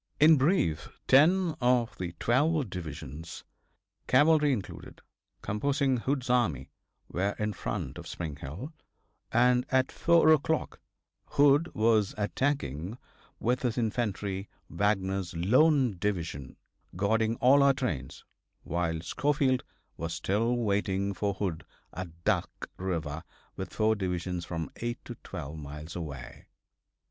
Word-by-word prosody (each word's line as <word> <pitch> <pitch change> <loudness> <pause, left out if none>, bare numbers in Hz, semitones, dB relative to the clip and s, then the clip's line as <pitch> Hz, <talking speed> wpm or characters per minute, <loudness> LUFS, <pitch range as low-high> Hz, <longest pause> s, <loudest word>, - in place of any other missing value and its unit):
In 155 +2 +8
brief, 130 - +1 0.2
ten 165 +6 +5
of 120 -1 +2
the 90 -2 -4
twelve 140 - +2
divisions, 80 -2 -7 0.6
cavalry 150 +2 +5
included, 105 -8 -5 0.4
composing 135 +5 +1
Hood's 130 +2 -1
army, 110 - +1 0.4
were 100 +3 -1
in 105 0 -1
front 65 -1 -4
of 85 - -9
Spring 80 -4 -5
Hill, 90 - -7 0.6
and 125 +1 +4
at 130 0 +2
4 170 -2 +4
o'clock 155 +1 0 0.5
Hood 145 +2 +4
was 110 -2 +2
attacking 105 - -1 0.4
with 125 +2 0
his 120 -2 -1
infantry 105 -4 -2 0.2
Wagner's 95 -3 0
lone 125 - +3
division, 85 -9 -3 0.4
guarding 110 +4 +1
all 135 +4 +5
our 140 -1 +5
trains, 75 - -4 0.4
while 80 -1 -1
Schofield 135 - +1 0.3
was 80 0 -3
still 115 +8 0
waiting 100 -3 0
for 100 0 -1
Hood 90 -5 -3 0.3
at 85 -2 -8
Duck - - -1
river 80 -4 -3 0.3
with - - -6
four 110 0 +2
divisions 90 -2 -3
from 80 -2 -4
eight 120 0 -3
to - - -6
twelve 75 +3 -7
miles 75 +2 -8
away. 70 -8 -7
105 Hz, 120 wpm, -29 LUFS, 85-130 Hz, 0.6 s, In